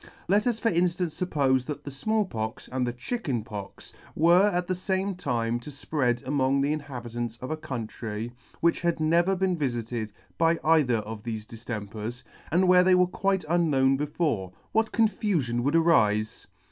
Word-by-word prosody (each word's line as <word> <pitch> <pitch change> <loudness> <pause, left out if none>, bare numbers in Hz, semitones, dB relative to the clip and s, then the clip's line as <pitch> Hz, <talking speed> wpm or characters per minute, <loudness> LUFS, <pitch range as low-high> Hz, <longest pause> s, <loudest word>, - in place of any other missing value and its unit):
Let 205 +5 +3
us 240 -2 +1
for 230 - +1
inftance 175 -1 0
fuppofe, 135 -7 +2
that 145 -1 -5
the 140 - -6
Small 215 +10 0
Pox 110 -7 -5
and 130 -1 -1
the - - 0
Chicken 130 - -3
Pox 100 -3 -8 0.2
were 175 +5 +5
at 180 -3 0
the 185 - -1
fame 190 +2 -1
time 120 -9 -1
to 120 - -10
fpread 130 -4 -1
among 135 0 +1
the 145 +2 +1
inhabitants 120 -6 -5
of 130 +4 -6
a - - 0
country 115 -6 -5 0.3
which 170 0 +2
had 170 -2 0
never 170 +4 +3
been 190 -1 +1
vifited 120 -6 -3 0.3
by 165 0 +4
either 155 -7 +4
of 110 0 -6
thefe 110 -1 -5
diftempers, 110 +1 -6 0.3
and 180 +3 +3
where 180 0 +6
they 185 0 +5
were 180 0 +5
quite 190 +1 -1
unknown 150 -6 +3
before; 145 - -1 0.2
what 220 0 +1
confufion 190 - +1
would 140 +6 +1
arife 110 -11 +2
145 Hz, 170 wpm, -27 LUFS, 120-180 Hz, 0.3 s, where